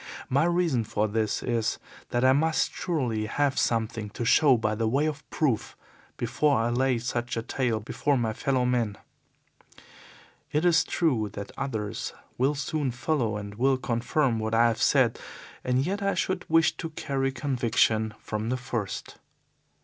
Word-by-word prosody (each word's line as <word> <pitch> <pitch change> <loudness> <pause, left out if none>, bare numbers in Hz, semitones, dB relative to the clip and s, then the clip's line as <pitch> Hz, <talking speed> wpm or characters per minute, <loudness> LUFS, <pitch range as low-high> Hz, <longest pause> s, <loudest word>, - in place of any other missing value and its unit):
My 140 +4 +3
reason 170 -8 +1
for 105 0 -1
this 110 0 -1
is 115 -3 0 0.3
that 120 +1 +1
I 130 - +6
must 160 +3 +1
surely 120 -11 -1
have 140 +4 +1
something 110 -2 0
to 120 - -2
show 135 +1 +5
by 110 -1 0
way 115 +7 +1
of 150 -3 -4
proof 135 -9 -1 0.4
before 135 +5 +1
I 115 +1 +1
lay 130 +1 +2
such 120 0 -3
a 115 - -2
tale 120 -2 -1
before 140 +6 0
my 115 -3 0
fellow 130 +2 0
men. 120 -5 0 1.5
It 150 +4 +1
is 175 -1 +5
true 125 -11 0
that 100 -1 -6
others 110 -7 -3 0.2
will 135 +4 +1
soon 145 0 -1
follow 120 -3 -1
and 100 -1 -7
will 130 +5 +2
confirm 120 0 0
what 110 +1 -1
I 115 +1 +5
have 115 0 -3
said, 130 -5 +3 0.4
and 130 +2 +1
yet 200 +4 -2
I 195 0 +1
should 185 -1 -1
wish 165 0 +4
to 165 - -4
carry 135 -3 -2
conviction 115 -5 +1
from 110 +1 -4
the 130 - 0
first. 120 -6 -5
125 Hz, 160 wpm, -27 LUFS, 115-145 Hz, 1.5 s, I